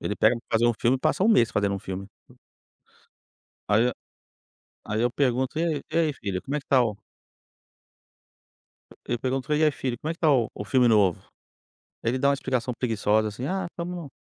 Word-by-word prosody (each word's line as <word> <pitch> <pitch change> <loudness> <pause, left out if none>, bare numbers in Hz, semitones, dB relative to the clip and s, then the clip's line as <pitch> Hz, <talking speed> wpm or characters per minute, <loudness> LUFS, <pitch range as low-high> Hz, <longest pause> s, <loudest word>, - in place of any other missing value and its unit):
Ele 105 - -2
pega 110 +3 +4
para 115 -1 -1
fazer 120 - +3
um 120 - +4
filme, 125 +3 +2
passa 185 - +1
1 225 - +4
mês 120 - +4
fazendo 100 -2 0
um 100 - -3
filme. 95 +1 -6 1.6
Aí, 110 +3 +3
eh - - 0 0.9
aí 110 +1 -2
eu 120 0 +2
pergunto: 130 +1 0
"E - - +1
ai 155 -4 -1
e 160 - 0
ai 160 -3 +2
filho 95 -7 -4
como 140 +2 -4
é - - 0
que 135 - -18
está 130 -2 +4
o" 110 -3 -2 2.1
Eu 120 - -1
pergunto: 135 +3 -1
"E 150 - +2
aí 155 - +4
filho 130 -3 -3
como 155 - -4
é - - -1
que 165 - -19
está 155 -3 +3
o 120 -5 +2
o - - -6
filme 125 +4 +3
novo?" 105 -6 +3 0.8
Aí 115 - +1
ele 130 - -2
dá 140 - +3
uma - - +3
explicação 130 -2 -2
preguiçosa, 110 -2 +1
assim: 120 +5 -6
"Ah 190 +5 -2
estamos 175 -3 -6
125 Hz, 205 wpm, -25 LUFS, 110-145 Hz, 2.1 s, pega